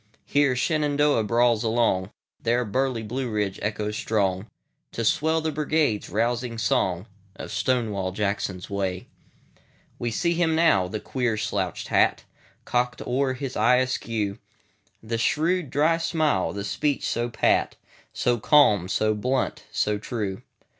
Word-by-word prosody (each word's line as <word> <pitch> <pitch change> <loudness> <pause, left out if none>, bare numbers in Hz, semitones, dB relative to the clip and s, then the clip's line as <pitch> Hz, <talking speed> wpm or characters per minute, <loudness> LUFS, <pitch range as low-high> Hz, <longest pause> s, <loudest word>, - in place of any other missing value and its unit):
Here 145 -3 +2
Shenandoah 145 -2 +2
brawls 120 +1 +2
along, 110 -5 +1 0.3
There 120 +1 +1
burly 125 +1 -1
Blue 125 +4 -3
Ridge 105 -3 -2
echoes 105 0 -2
strong, 100 -2 0 0.5
To 115 - -2
swell 160 +7 +2
the 160 0 -1
Brigade's 150 -6 0
rousing 115 +2 -1
song, 95 -3 0 0.3
Of - - -8
Stonewall 105 -4 0
Jackson's 100 -2 -2
Way.We 100 +4 -7
see 170 +10 0
him 165 -2 +1
now—the 110 - +2
queer 120 -4 -1
slouched 100 -4 -3
hat, - - +2 0.4
Cocked 125 0 -1
o'er 130 +1 0
his 135 -1 -5
eye 115 +4 +4
askew; 115 -5 -1 0.6
The 115 +1 -3
shrewd, 165 +6 +1
dry 155 +5 +2
smile; 155 - +1
the 100 - -5
speech 145 +7 -1
so 120 +1 -1
pat, 120 - +1 0.4
So 120 -1 0
calm, 105 - +4
so 110 +1 +1
blunt, 125 +5 -1
so 105 0 0
true. 105 -4 -4
115 Hz, 130 wpm, -25 LUFS, 105-135 Hz, 0.6 s, eye